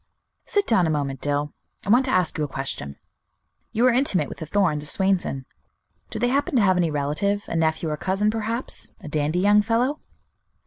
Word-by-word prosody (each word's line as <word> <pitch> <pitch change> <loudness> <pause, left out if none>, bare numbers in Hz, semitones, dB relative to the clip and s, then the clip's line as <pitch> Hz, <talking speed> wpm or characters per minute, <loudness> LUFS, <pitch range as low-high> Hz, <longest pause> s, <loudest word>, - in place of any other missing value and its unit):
"Sit 410 -1 +1
down 190 -8 +3
a - - 0
moment, 140 -3 -2
Dill; 145 0 -1 0.3
I - - -5
want 245 +4 +5
to 260 - -1
ask 180 -3 +1
you 155 - -1
a - - -1
question. 135 - -5 0.8
You 235 +3 +2
are 255 - +5
intimate 250 -7 +2
with - - -9
the 160 - -6
Thorns, 165 -5 +1
of 150 - -11
Swainson; 190 -9 0 0.6
do - - -6
they 245 +3 +1
happen 280 +2 0
to 240 - +5
have 185 -2 +4
any 175 -2 +2
relative, 155 +8 -1
a - - -4
nephew 160 0 +1
or 150 - -2
cousin, 195 +6 0
perhaps, 225 +3 -2
a 180 - -9
dandy 150 +2 -1
young 205 +1 +5
fellow?" 245 +7 0
185 Hz, 200 wpm, -24 LUFS, 150-225 Hz, 0.8 s, want